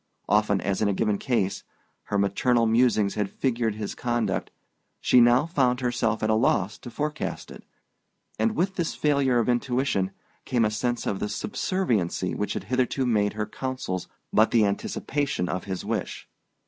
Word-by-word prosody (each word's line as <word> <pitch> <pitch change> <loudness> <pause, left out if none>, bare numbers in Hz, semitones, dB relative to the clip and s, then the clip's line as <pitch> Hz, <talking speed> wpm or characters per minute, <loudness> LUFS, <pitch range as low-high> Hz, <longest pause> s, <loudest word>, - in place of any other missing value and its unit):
Often 105 -1 +2
as 100 +2 -1
in 105 - +3
a 100 - +1
given 105 -1 0
case, 110 -7 -1 0.4
her 100 - -1
maternal 115 +4 +2
musings 115 -3 +3
had 105 -2 -1
figured 115 -4 -1
his 105 -1 -4
conduct, 115 -6 -1 0.5
she 125 - +5
now 120 +4 +5
found 130 -7 +1
herself 120 -3 0
at 110 - +1
a - - +4
loss 105 -3 +1
to 125 - -9
forecast 150 +5 -4
it; - - -11 0.8
and 225 -1 +1
with 190 +3 0
this 170 -3 -1
failure 140 -4 +2
of 115 - +1
intuition 125 -5 +1 0.3
came 120 -3 +1
a 105 - +1
sense 120 +3 -1
of 100 - -1
the 105 - -2
subserviency 110 - -1
which 105 - -2
had 95 - -3
hitherto 130 +4 0
made 105 -4 +2
her 105 0 -2
counsels 130 -6 -4 0.3
but 110 +1 +5
the 115 -3 +4
anticipation 135 +3 -1
of 90 +1 -3
his 95 -1 -4
wish. 110 -2 -3
115 Hz, 170 wpm, -26 LUFS, 100-130 Hz, 0.8 s, she